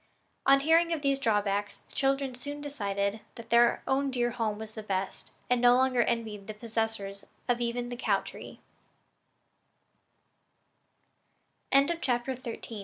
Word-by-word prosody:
On 275 0 +7
hearing 330 +3 +4
of 315 -3 -1
these 275 -1 +2
drawbacks 205 -4 0
the - - -19
children 270 -1 +1
soon 285 +4 -6
decided 200 -7 -2 0.2
that 230 -1 -11
their 235 0 +5
own 275 +1 +1
dear 240 -2 0
home 225 -3 -1
was 220 0 -8
the 220 - -6
best, 195 -2 -3 0.2
and 250 -1 +2
no 245 0 +7
longer 255 -1 +3
envied 220 -4 -2
the 215 - -6
possessors 220 -3 -3 0.3
even 240 0 -1
of - - -7
the 245 - -4
cow - - +2
tree. - - -10
235 Hz, 130 wpm, -29 LUFS, 210-270 Hz, 0.3 s, On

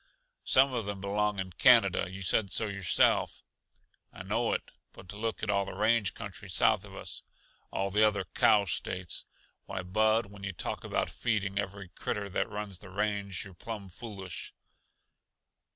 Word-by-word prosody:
"Some 130 0 +5
of 115 -4 -1
them 100 -1 -3
belong 105 +1 0
in 95 -1 -3
Canada 100 -6 +5
you 95 +1 -7
said 100 +1 +1
so 110 - +1
yourself." 100 -4 +2 0.7
"I - - -9
know 110 +5 0
it, - - -3 0.2
but 95 +1 -11
look 110 +2 -3
at 100 - +1
all 100 0 +2
the 105 +2 +2
country 105 -2 -8
south 90 - +3
of - - -12
us: - - -6 0.5
all 95 0 -1
the 105 +2 +3
other 105 -3 +3
cow 105 -3 +5
States. 90 0 -2 0.4
Why, 95 - -4
Bud, 110 +4 +2
when 100 0 -13
yuh 100 -1 -3
talk - - -4
about - - -1
feeding 100 -4 -1
every 100 -1 -5
critter 100 +2 -3
that 105 - 0
runs 105 -3 -4
the 100 - -11
range, 100 -1 -2
you're 100 - -11
plumb 100 +1 -7
foolish." 95 -3 -7
100 Hz, 165 wpm, -30 LUFS, 95-110 Hz, 0.7 s, Some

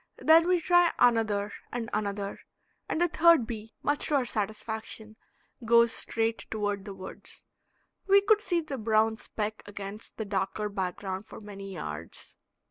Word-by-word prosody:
Then 325 +2 +5
we 360 -1 +3
try 350 0 +4
another 220 -4 +2 0.2
and 240 -2 -3
another, 200 -1 -2 0.5
and - - -1
the 350 - +4
third 335 -6 +5
bee, 220 -2 -7
much 290 0 0
to 300 - +1
our 265 -3 +2
satisfaction, 220 0 -5 0.5
goes 235 0 +5
straight 225 0 -1
toward 205 -2 -2
the 200 -2 -7
woods. 185 - -9 0.6
We 400 0 +6
could 420 +1 +3
see 350 -4 0
the 285 -5 -6
brown 220 0 +2
speck 215 -1 -4
against 205 +1 -8
the 220 - -3
darker 205 +1 -2
background 190 0 -4
for - - -10
many 200 -2 -9
yards. 75 - -7
220 Hz, 150 wpm, -28 LUFS, 205-270 Hz, 0.6 s, We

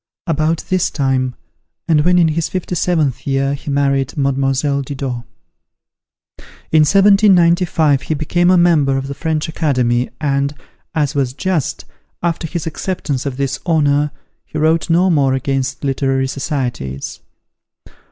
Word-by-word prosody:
About 160 0 0
this 185 -1 +1
time, 130 -3 -1 0.5
and 155 -3 +4
when 180 +3 +3
in 170 -2 +4
his 160 +1 -1
fifty 185 -1 -4
seventh 160 -7 0
year, 135 0 +1
he 145 +1 -6
married 140 -1 0
Mlle. 140 -1 +1 0.5
Didot. 130 -3 -5 1.5
In 155 - +5
1795, 175 -5 +4
he 155 - -2
became 175 +4 +1
a 185 - +5
member 155 -6 +3
of 135 - -3
the 140 - -4
French 155 +2 -2
Academy, 130 -6 0
and, 140 -1 0 0.4
as 150 -2 0
was 135 -4 -1
just, 170 0 -2 0.4
after 170 -1 -1
his 170 -1 -4
acceptance 155 -5 -3
of 130 -2 -4
this 135 -1 -2
honour, 150 -3 +2 0.3
he - - -8
wrote 160 +2 +1
no 180 +3 +3
more 135 -4 +2
against 135 +1 -2
literary 135 -1 0
societies. 130 - -4
145 Hz, 135 wpm, -17 LUFS, 135-165 Hz, 1.5 s, In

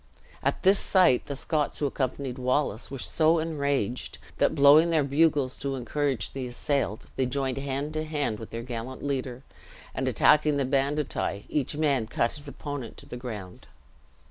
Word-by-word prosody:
At - - -1
this 195 +1 +5
sight, 180 -10 +3
the 140 - -3
Scots 150 +1 -1
who 145 - -1
accompanied 130 -1 -2
Wallace 125 -3 0
were 135 - -5
so 160 +5 +2
enraged 140 -7 -1 0.2
that, - - +3
blowing 145 +4 +7
their 160 -3 +3
bugles 140 -2 +2
to 135 0 -2
encourage 130 - -1
the 130 -2 -4
assailed, 125 -2 -2
they 130 - +1
joined 135 0 -1
hand 140 +2 -3
to 155 0 -1
hand 145 -8 -2
with 110 - -8
their 115 0 -5
gallant 120 +1 -6
leader, 130 -2 -3 0.5
and - - -2
attacking 150 -1 +4
the 140 - +1
banditti, 135 -5 -1
each 145 0 -1
man 140 -7 +1
cut 115 +1 0
his 145 -1 -10
opponent 140 -4 -6
to - - -13
the - - -8
ground. 110 -7 -8
140 Hz, 170 wpm, -27 LUFS, 125-150 Hz, 0.5 s, blowing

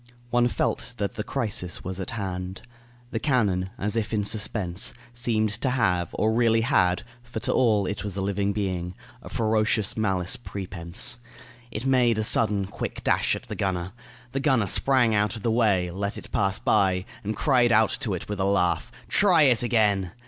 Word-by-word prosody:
One 120 0 +3
felt 125 0 -2
that 100 -2 -2
the 105 - -4
crisis 105 -9 -2
was 95 +1 -5
at 95 - -4
hand. 95 -4 -5 0.5
The 115 - -2
cannon, 100 -10 +1
as 105 +3 -1
if 110 -2 -1
in 105 -2 0
suspense, 100 -3 0 0.2
seemed 115 -3 0
to 130 - +1
have, 100 -9 +1
or 110 +1 +1
really 115 -1 +3
had 95 -8 +2 0.2
for 120 -2 -6
to 130 0 0
all 110 -5 +3
it 100 - -3
was 100 -2 -5
a - - -1
living 100 0 0
being 90 -3 -3 0.3
a - - -10
ferocious 110 -1 +1
malice 95 -5 0
prepense. 95 0 -2 0.5
It 110 +3 -5
made 125 -4 +3
a 110 - 0
sudden, 105 -2 +2
quick 95 - -6
dash - - +2
at - - -8
the - - -7
gunner. 95 -1 -2 0.4
The 135 - -2
gunner 130 -6 +2
sprang 125 +3 +2
out 105 +1 +1
of 110 - -8
the 115 - +1
way, 100 -6 +2
let 100 +3 -3
it - - -10
pass 95 -1 +1
by, 95 -1 +2 0.2
and 110 +2 -3
cried 125 -4 +3
out 110 0 +4
to 105 -5 -1
it 90 - -7
with 105 -1 -4
a - - +1
laugh, 95 -3 +1 0.2
"Try 180 -6 +4
it 125 -5 +4
again!" 105 -6 +1
105 Hz, 185 wpm, -25 LUFS, 95-120 Hz, 0.5 s, out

